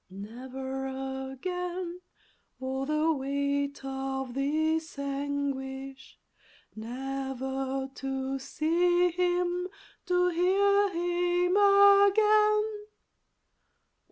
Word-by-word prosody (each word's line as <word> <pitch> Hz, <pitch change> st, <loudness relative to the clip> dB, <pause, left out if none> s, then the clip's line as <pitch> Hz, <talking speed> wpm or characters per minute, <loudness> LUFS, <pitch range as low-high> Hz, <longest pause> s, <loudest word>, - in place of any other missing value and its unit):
Never 260 Hz, +7 st, -6 dB, 0.4 s
again! 360 Hz, +4 st, -4 dB, 0.6 s
oh 265 Hz, +1 st, -3 dB
the 305 Hz, +2 st, +2 dB
weight 280 Hz, 0 st, -2 dB
of 265 Hz, -1 st, -4 dB
this 315 Hz, +4 st, 0 dB
anguish! 275 Hz, -1 st, -4 dB, 0.6 s
Never 265 Hz, +2 st, -4 dB
to 270 Hz, 0 st, -3 dB
see 350 Hz, +5 st, +2 dB
him, 355 Hz, 0 st, 0 dB, 0.4 s
to 360 Hz, 0 st, +3 dB
hear 400 Hz, +4 st, +3 dB
him 355 Hz, +1 st, 0 dB
again! 415 Hz, +1 st, +5 dB
290 Hz, 70 wpm, -29 LUFS, 270-360 Hz, 0.6 s, again